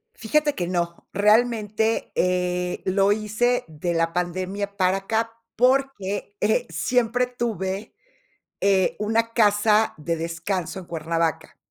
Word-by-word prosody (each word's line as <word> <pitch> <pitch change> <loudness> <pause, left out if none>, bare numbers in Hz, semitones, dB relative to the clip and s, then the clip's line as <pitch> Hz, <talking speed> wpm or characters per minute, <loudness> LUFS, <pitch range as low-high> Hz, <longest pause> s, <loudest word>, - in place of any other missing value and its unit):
Fíjate 295 +6 +1
que 175 -1 -2
no. 170 -1 -3
Realmente, 220 +1 +2
eh, 180 0 0
lo 195 +1 +3
hice 215 +4 +1
de 160 +3 -3
la 165 0 0
pandemia 185 +3 -3
para 185 0 +3
acá, 225 +3 -1 0.2
porque 250 -6 +1
eh, 220 +3 +2
siempre 250 0 +1
tuve 215 -4 -3 0.7
eh, 195 -2 +2
una 225 +2 0
casa 215 0 +3
de 165 +2 -2
descanso 170 +3 -3
en 185 - -10
Cuernavaca, 165 0 -2
200 Hz, 120 wpm, -24 LUFS, 180-225 Hz, 0.7 s, lo